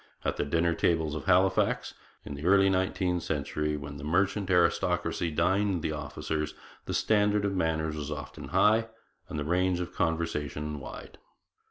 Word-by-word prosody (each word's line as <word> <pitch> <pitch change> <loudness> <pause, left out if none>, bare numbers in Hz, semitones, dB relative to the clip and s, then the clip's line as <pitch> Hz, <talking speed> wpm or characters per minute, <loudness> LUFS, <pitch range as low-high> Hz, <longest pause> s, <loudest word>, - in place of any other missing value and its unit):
At - - 0
the - - 0
dinner 85 +3 +1
tables 80 -3 +1
of 75 -2 -5
Halifax 95 0 +2 0.3
in - - -6
the 70 +1 -7
early 95 0 +5
nineteenth 95 -1 0
century, 75 0 -2
when 70 0 -7
the 70 - -9
merchant 95 +5 +1
aristocracy 85 -1 +2
dined 95 +2 +1
the - - 0
officers, 75 0 -3 0.3
the - - -3
standard 105 -1 +2
of 100 - 0
manners 80 -3 0
was 75 -1 -5
often 75 -1 -7
high 110 +2 +3 0.4
and - - -5
the 75 - -2
range 90 +2 +1
of 90 - -4
the - - -23
conversation 75 -2 -2
wide. - - -10
85 Hz, 165 wpm, -29 LUFS, 75-95 Hz, 0.4 s, early